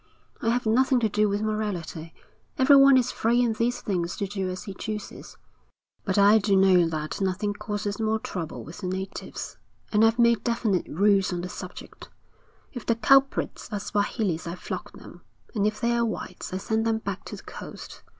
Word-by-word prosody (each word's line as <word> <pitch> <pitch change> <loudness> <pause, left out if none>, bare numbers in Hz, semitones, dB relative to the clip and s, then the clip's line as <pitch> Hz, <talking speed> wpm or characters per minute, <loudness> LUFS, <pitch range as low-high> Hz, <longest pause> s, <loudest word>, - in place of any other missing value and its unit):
I 230 - +1
have 245 +1 0
nothing 255 +3 +3
to 220 - +2
do 210 +1 +2
with 205 +1 -1
morality 185 -7 -3 0.5
everyone 275 0 +7
is 255 -1 +1
free 235 +2 +1
in 235 -2 +1
these 235 +2 -1
things 175 -4 -2
to 200 - -1
do 195 -1 -3
as 185 0 -5
he 195 - -7
chooses 210 +2 -7 0.7
but - - 0
I 205 +2 +6
do 200 -1 +2
know 185 -3 +5
that 155 +3 -4
nothing 195 +2 0
causes 205 0 -4
more 220 0 +1
trouble 185 -9 -6
with 165 +6 -10
the 190 - -4
natives, 190 +1 -5 0.3
and 215 0 +4
I've 225 +1 +4
made 235 -1 +4
definite 230 -6 0
rules 195 +2 +3
on 175 -1 -2
the 180 - -5
subject. - - -9 0.6
If 245 -4 -6
the 230 - +3
culprits 270 +4 +2
are 205 - -2
Swahilis 205 -4 -1
I 170 - -4
flog - - -6
them, - - -13 0.3
and 210 -3 +1
if 215 0 -3
they're 235 0 +1
whites 210 -5 -5
I 185 - -2
send 220 +3 -1
them 225 -1 +2
back 200 -3 -5
to - - -7
the - - -12
coast. - - -10
210 Hz, 190 wpm, -26 LUFS, 190-230 Hz, 0.7 s, everyone